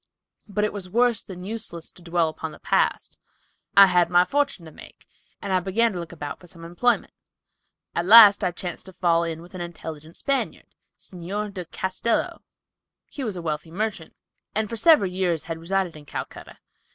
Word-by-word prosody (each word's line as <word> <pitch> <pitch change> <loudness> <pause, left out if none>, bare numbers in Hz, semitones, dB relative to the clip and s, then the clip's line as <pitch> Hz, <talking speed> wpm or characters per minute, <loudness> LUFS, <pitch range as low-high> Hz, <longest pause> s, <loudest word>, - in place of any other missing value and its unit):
But 210 0 -1
it 210 - 0
was 195 -3 -6
worse 235 +2 +2
than 180 -2 -10
useless 195 -5 -6
to - - -16
dwell 170 -1 +1
upon 160 0 -6
the 155 - -12
past. - - 0 0.6
I 200 - +11
had 180 -2 +3
my 175 0 +5
fortune 280 -6 -1
to 160 - -11
make, - - -15 0.3
and 195 - -3
I 185 - +4
began 205 +5 +1
to 180 - -4
look 170 -2 -7
about 150 -4 -7
for 180 - -16
some 165 -1 -12
employment. 235 +9 0 0.8
At 170 +1 -2
last 210 -1 +9
I - - +2
chanced 175 +1 -7
to 190 - -11
fall 170 -1 +2
in 165 -1 -4
with 175 - -16
an 185 - -6
intelligent 160 -2 -8
Spaniard, 275 -1 -2 0.3
Signor 195 +4 -5
de 185 -3 -6
Castello. 190 +7 -2 0.7
He 280 - -5
was 215 -6 -3
a 175 - -6
wealthy 155 0 -3
merchant, 195 -2 -4 0.4
and 215 -1 0
for 230 - -4
several 230 - +5
years 180 -4 0
had 165 -1 -5
resided 185 0 -1
in 150 -1 -12
Calcutta. - - -7
180 Hz, 190 wpm, -24 LUFS, 170-210 Hz, 0.8 s, I